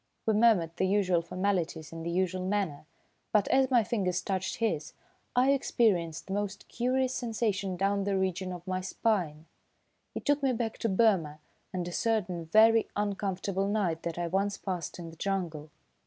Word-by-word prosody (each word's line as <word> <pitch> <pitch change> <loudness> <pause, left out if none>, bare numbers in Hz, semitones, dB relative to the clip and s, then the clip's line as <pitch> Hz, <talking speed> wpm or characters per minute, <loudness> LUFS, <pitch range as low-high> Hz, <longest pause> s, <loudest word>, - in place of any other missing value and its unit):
We 220 - +3
murmured 205 -7 +3
the 190 - +2
usual 185 -3 +2
formalities 170 -3 -2
in 165 - -6
the 165 - -3
usual 185 +1 0
manner, 185 -7 -2 0.4
but 210 -2 +3
as 265 -1 +4
my 245 -4 +4
fingers 185 -5 -1
touched 190 -1 -2
his, 170 -10 -1 0.4
I 255 +2 +5
experienced 185 - +1
the 190 - -5
most 205 0 -3
curious 255 +1 0
sensation 215 -6 -1
down 195 +1 +1
the 200 -1 +1
region 185 0 -1
of 175 -1 -8
my 185 0 -2
spine. 180 -6 -1 0.7
It - - -5
took 290 0 +2
me 270 -2 +2
back 225 -1 -3
to 225 - 0
Burma 190 -7 +2 0.3
and 180 -2 -3
a - - -4
certain 185 -5 -1
very 220 +6 +5
uncomfortable 195 -1 -1
night 190 -6 0
that 170 -1 -4
I 175 - -1
once 195 +3 0
passed 180 -3 -4
in 170 -2 -7
the 165 - -15
jungle. 170 -6 -3
195 Hz, 170 wpm, -30 LUFS, 175-215 Hz, 0.7 s, I